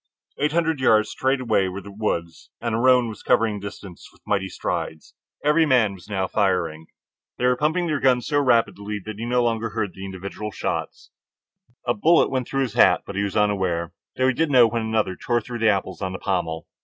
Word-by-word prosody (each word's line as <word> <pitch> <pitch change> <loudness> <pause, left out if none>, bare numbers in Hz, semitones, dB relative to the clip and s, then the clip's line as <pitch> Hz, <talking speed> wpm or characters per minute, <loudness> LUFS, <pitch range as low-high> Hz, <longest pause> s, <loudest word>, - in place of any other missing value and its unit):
Eight 150 +1 +1
hundred 160 -2 +1
yards 110 -4 +3
straight 130 +1 0
away 110 -6 +1
were 95 +2 -6
the 100 0 -11
woods, 85 -5 -3
and 115 -2 -3
the 110 - 0
roan 125 -1 +4
was 110 - -8
covering 110 -2 +2
the 100 - -6
distance 100 -3 -11
with - - -24
mighty 95 -2 0
strides. 80 -2 -4 0.3
Every 150 +2 +4
man 120 -7 +3
was 95 +2 -14
now 95 -2 -1
firing. 90 -6 -1 0.5
pumping 150 +8 +1
their 155 -4 -1
guns 125 -2 +2
so 145 -1 +1
rapidly 105 -5 +1
that 110 -1 -7
he 115 - -3
no 125 0 +1
longer 115 -1 0
heard 105 -6 -3
individual 95 +2 -6
shots. - - -4 0.7
A 120 - +2
bullet 165 +11 +3
went 130 -2 -1
through 135 0 0
his 120 -5 -4
hat, - - +4
but 100 - -8
he 100 - 0
was 100 0 -2
unaware, 95 -5 0 0.2
though 130 - +3
he 130 - +3
did 160 +5 0
know 125 -4 +7
when 115 +1 -1
another 110 -4 -1
tore 120 +6 0
through 120 +1 -7
the 110 0 +4
apples 95 -2 -1
on 95 -1 -3
the - - -4
pommel. 85 -4 -2
110 Hz, 205 wpm, -23 LUFS, 95-125 Hz, 0.7 s, know